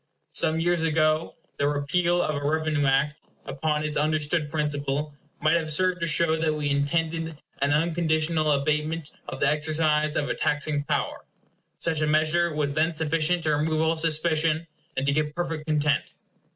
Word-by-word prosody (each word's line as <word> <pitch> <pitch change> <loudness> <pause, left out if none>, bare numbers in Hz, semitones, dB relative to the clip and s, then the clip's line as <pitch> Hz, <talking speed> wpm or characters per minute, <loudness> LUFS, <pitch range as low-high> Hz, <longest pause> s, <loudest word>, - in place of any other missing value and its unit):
Some 160 0 +1
years 175 0 +1
ago 155 0 +1 0.2
the 140 - +1
repeal 170 +5 +1
of 155 - -1
a 145 - -4
revenue 155 -1 +1
Act, 140 +3 +1 0.3
upon 150 +2 -1
its 150 0 -1
understood 150 +1 0
principle, 145 -1 -2 0.3
might 155 +2 +3
have 160 -2 -3
served 180 +3 +2
to 170 - -1
show 160 +1 +3
that 160 -1 0
we 145 -1 -1
intended 160 +2 -1 0.2
an 140 - +2
unconditional 160 0 +1
abatement 150 +2 -1 0.2
of - - -6
the - - +3
exercise 155 0 +1
of 145 - 0
a - - 0
taxing 145 0 -1
power. - - -2 0.5
Such 160 -2 -1
a 155 - +1
measure 155 +3 +2
was 150 -2 -1
then 160 +2 +1
sufficient 160 +2 0
to 155 -1 +2
remove 155 +1 0
all 160 +1 +2
suspicion, 160 0 +1 0.3
and 135 - 0
to 140 - +2
give 150 +1 -1
perfect 165 -3 -3
content. 150 -2 0
155 Hz, 165 wpm, -26 LUFS, 150-165 Hz, 0.5 s, might